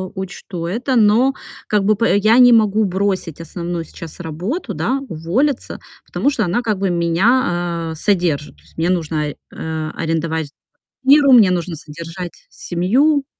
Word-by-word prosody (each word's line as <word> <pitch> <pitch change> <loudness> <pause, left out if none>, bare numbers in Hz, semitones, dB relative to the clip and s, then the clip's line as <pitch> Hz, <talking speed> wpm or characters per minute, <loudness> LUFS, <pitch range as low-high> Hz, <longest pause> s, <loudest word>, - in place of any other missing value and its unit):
учту 185 -2 -6
это. 245 +9 -1
Но 230 +4 +4 0.3
как 210 -2 +1
бы 215 +2 +3
п 210 -1 +2
я 215 +4 +4
не 245 -1 +8
могу 215 -1 +3
бросить 190 -4 -2
основную 170 +1 -5
сейчас 165 0 -11
работу, 175 - -4
да, 270 +1 -1
уволиться, 210 - -1 0.3
потому 280 - 0
что 250 -7 -1
она 180 +7 0
как 215 -5 -1
бы 195 -1 0
меня, 175 -1 +1
а, - - -6
содержит. 165 - -1
То - - -24
есть 80 - -24
мне 165 +2 0
нужно, 155 -4 -1 0.2
а, 160 -1 -4
арендовать 160 -2 -2 0.5
квартиру, 275 0 +6
мне 220 -7 +7
нужно 175 -1 -2
содержать 165 +3 -8 0.2
семью. 270 - +1
180 Hz, 150 wpm, -18 LUFS, 165-225 Hz, 0.5 s, не